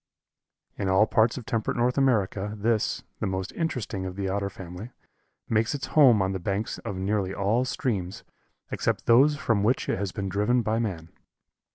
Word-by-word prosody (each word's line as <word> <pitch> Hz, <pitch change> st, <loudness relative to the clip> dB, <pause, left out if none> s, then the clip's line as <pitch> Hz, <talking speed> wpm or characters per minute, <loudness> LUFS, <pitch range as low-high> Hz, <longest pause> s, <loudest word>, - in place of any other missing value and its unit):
In 100 Hz, -2 st, 0 dB
all 95 Hz, +3 st, +5 dB
parts 110 Hz, +2 st, +2 dB
of 125 Hz, -, -7 dB
temperate 115 Hz, -3 st, -1 dB
North 125 Hz, +1 st, +2 dB
America 105 Hz, -6 st, +1 dB
this, 110 Hz, +1 st, 0 dB, 0.2 s
the -, -, -1 dB
most 95 Hz, 0 st, -3 dB
interesting 120 Hz, -, -3 dB
of 90 Hz, -, -7 dB
the 100 Hz, -1 st, -2 dB
Otter 100 Hz, +1 st, -1 dB
family, 95 Hz, +3 st, -9 dB, 0.6 s
makes 110 Hz, +3 st, +1 dB
its 140 Hz, -, -4 dB
home 125 Hz, -10 st, +6 dB
on 95 Hz, -, -1 dB
the 95 Hz, -, -3 dB
banks 100 Hz, +4 st, -3 dB
of 100 Hz, -, -5 dB
nearly 95 Hz, 0 st, -1 dB
all 110 Hz, +6 st, +1 dB
streams 100 Hz, -8 st, -3 dB, 0.5 s
except -, -, -1 dB
those 140 Hz, +6 st, +5 dB
from 115 Hz, -7 st, +1 dB
which 115 Hz, +5 st, +1 dB
it -, -, -1 dB
has 100 Hz, -2 st, -2 dB
been 100 Hz, +1 st, -4 dB
driven 105 Hz, +6 st, +1 dB
by 110 Hz, +1 st, 0 dB
man. 90 Hz, -8 st, -3 dB
105 Hz, 180 wpm, -26 LUFS, 95-120 Hz, 0.6 s, home